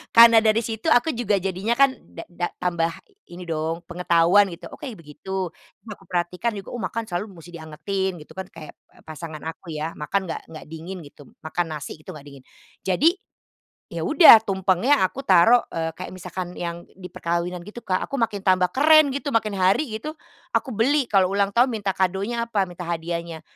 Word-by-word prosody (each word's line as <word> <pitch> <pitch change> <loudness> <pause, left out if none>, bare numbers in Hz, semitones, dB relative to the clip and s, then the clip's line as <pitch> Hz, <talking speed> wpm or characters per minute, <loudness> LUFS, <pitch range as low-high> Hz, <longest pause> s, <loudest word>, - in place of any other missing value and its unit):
karena 230 -1 +9
dari 220 0 +3
situ 225 +4 -5
aku 310 +3 +3
juga 235 -4 0
jadinya 195 +5 -1
kan 275 -1 +5 0.2
da-da 175 +1 -5
tambah 170 -2 0 0.4
ini 175 +1 -8
dong 160 +1 -2
pengetahuan, 175 +3 +3
gitu. 170 - -9
Oh, - - -9
kayak 250 -7 -7
begitu 185 +4 -5 0.4
aku 210 -3 -10
perhatikan 180 +6 -1
juga. 195 - -9
Oh, 240 - -5
makan 220 +5 -3
selalu 180 +4 -3
musti 175 -1 -13
dianggetin, 175 +4 -4
gitu, 150 - -14
kan. 190 -1 -5
Kayak 155 -2 -11 0.2
a - - -21
pasangan 155 0 -8
aku 165 +1 -8
ya, 155 +2 -4
makan 185 +6 -2
enggak 160 - -4
enggak 155 - -10
dingin, 165 +4 -7
gitu. 145 -1 -16 0.2
Makan 175 +2 -1
nasi, 145 - -7
gitu, 155 - -10
enggak 150 -3 -12
dingin. 140 -2 -13 0.4
Jadi 190 - +4 0.8
ya - - -4
udah, 320 -10 +9
tumpengnya 190 +7 +2
aku 270 +8 -8
taruh, 220 +7 +6
eee, 165 0 -2
kayak 185 - -7
misalkan 180 0 -6
yang 170 0 -5
di 185 -1 -9
perkawinan, 170 +1 -2
gitu, 225 +3 -10
Kak. 185 -1 0
Aku 275 - -3
makin 210 -3 0
tambah 185 -1 +3
keren, 310 +1 +6
gitu, 285 +1 -3
makin 215 -2 +1
hari, 190 +11 +3
gitu, 305 +6 -6 0.4
aku 265 - 0
beli, 265 +6 +2
kalau 195 -3 +4
ulang 200 0 +1
tahun, 245 +2 +5
minta 205 -3 -2
kadonya 200 +6 -1
apa, 205 -4 +1
minta 175 0 -8
hadiahnya, 170 -1 -4
185 Hz, 185 wpm, -23 LUFS, 170-220 Hz, 0.8 s, karena